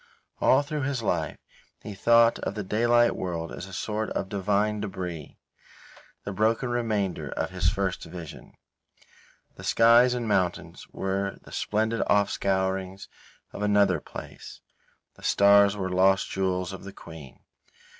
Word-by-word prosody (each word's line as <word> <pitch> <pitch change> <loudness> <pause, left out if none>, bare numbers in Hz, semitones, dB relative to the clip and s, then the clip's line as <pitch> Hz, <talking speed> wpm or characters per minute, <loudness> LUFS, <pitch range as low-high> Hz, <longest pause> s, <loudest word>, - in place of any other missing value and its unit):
All 135 +2 +4
through 150 +1 -4
his 130 -3 -2
life 80 -7 -1 0.5
he 105 - -7
thought 115 +3 +4
of - - -4
the 105 - -3
daylight 120 +4 +2
world 85 -3 -4
as 90 - -7
a - - -12
sort 105 +3 -3
of 95 - -3
divine 105 +2 0
debris, 90 -7 -6 0.9
the 100 - -5
broken 110 +5 0
remainder 110 -6 -2
of - - -3
his - - +1
first 95 -2 -2
vision. 85 -4 -10 1.0
The - - -10
skies 120 +2 +5
and 120 -2 -3
mountains 95 -4 -1
were 95 0 -3
the - - -15
splendid 110 +2 -1
off 100 0 +3
scourings 95 0 -2 0.4
of - - -7
another 100 -4 +3
place. - - -10 0.6
The - - -17
stars 100 0 +5
were 95 -2 -3
lost 95 +1 +3
jewels 95 0 -1
of 95 - -9
the 100 0 -9
Queen. 80 -6 -12
100 Hz, 145 wpm, -26 LUFS, 95-110 Hz, 1.0 s, skies